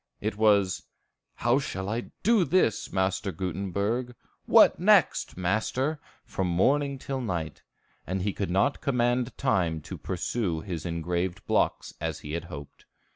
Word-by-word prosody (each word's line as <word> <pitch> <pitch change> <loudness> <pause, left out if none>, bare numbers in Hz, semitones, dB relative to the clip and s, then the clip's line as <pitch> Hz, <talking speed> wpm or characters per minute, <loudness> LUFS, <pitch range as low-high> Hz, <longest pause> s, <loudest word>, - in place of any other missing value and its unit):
It 105 0 -2
was, 100 -3 +3 0.5
"How 120 +4 +2
shall 95 -8 -4
I 115 +4 -3
do 225 -3 +4
this, 175 - +1
Master 95 +1 0
Gutenberg?" 100 +7 -2 0.3
"What - - +6
next, - - +3
master?" 110 - 0 0.3
from 95 - -2
morning 140 +11 +2
till 135 0 -4
night; 85 -9 -3 0.5
and 95 +1 -2
he 100 -1 0
could 100 - -3
not 100 +10 +1
command 125 -1 0
time 90 -12 +1
to - - -8
pursue 90 -1 -2
his 85 -3 -5
engraved 85 +2 -2
blocks, - - 0
as - - -3
he 75 - -7
had 85 +1 -3
hoped. 75 -5 -10
100 Hz, 140 wpm, -27 LUFS, 90-120 Hz, 0.5 s, What